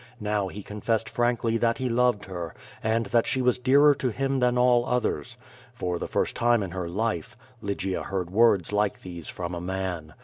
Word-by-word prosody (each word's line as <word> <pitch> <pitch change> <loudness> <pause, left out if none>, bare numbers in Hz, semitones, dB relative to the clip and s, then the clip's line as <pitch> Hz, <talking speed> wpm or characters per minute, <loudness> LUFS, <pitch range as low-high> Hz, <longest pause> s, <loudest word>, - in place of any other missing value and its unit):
Now 105 -2 0
he 100 +2 -8
confessed 110 +2 -1
frankly 120 -1 +1
that 115 0 +1
he 130 - -1
loved 120 -3 +2
her, 85 -4 -6 0.3
and 115 +1 +1
that 115 -1 +2
she 130 - 0
was 125 0 +2
dearer 140 +4 +6
to 130 -2 -1
him 135 +3 -1
than 125 0 +2
all 125 -1 +4
others. 125 -1 -1 0.4
For 90 -6 -2
the - - -3
first - - -1
time 120 -2 +3
in 95 - -5
her 90 -2 -4
life, 115 +4 -2 0.2
Lygia 100 -2 -2
heard 90 -3 -3
words 105 -3 +3
like 105 0 0
these 85 -3 -8
from 90 -1 -5
a 85 - -4
man. 90 -4 -4
110 Hz, 195 wpm, -26 LUFS, 95-120 Hz, 0.4 s, dearer